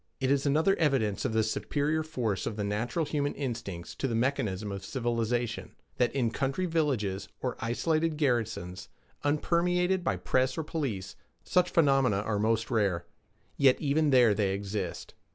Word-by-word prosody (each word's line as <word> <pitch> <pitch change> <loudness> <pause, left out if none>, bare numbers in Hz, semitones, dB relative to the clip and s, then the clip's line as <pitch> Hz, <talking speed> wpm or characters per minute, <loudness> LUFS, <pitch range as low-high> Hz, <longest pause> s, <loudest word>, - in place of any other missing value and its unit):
It 130 0 +1
is 140 0 +2
another 160 +7 +3
evidence 130 - +1
of - - 0
the 110 0 +3
superior 145 +7 0
force 125 -11 -2
of 110 - -3
the 105 - -2
natural 115 +10 -1
human 145 -1 -1
instincts 115 -10 -5
to 135 - -1
the 115 - -1
mechanism 110 -5 -1
of 100 -1 -5
civilization, 120 0 -2 0.2
that 125 - +2
in 120 -4 +1
country 135 +9 -1
villages 130 - 0
or 125 - -2
isolated 155 +6 0
garrisons, 115 - -1 0.3
unpermeated 180 +5 +1
by 100 - +1
press 130 +9 0
or 160 - -1
police, 135 - -3 0.3
such 180 0 +2
phenomena 135 -9 +3
are 105 -1 -1
most 115 +3 +1
rare. 100 -7 +1 0.5
Yet 135 -2 +5
even 150 +1 +2
there 125 -5 +6
they 100 -2 0
exist. 100 -1 -4
125 Hz, 155 wpm, -29 LUFS, 105-150 Hz, 0.5 s, there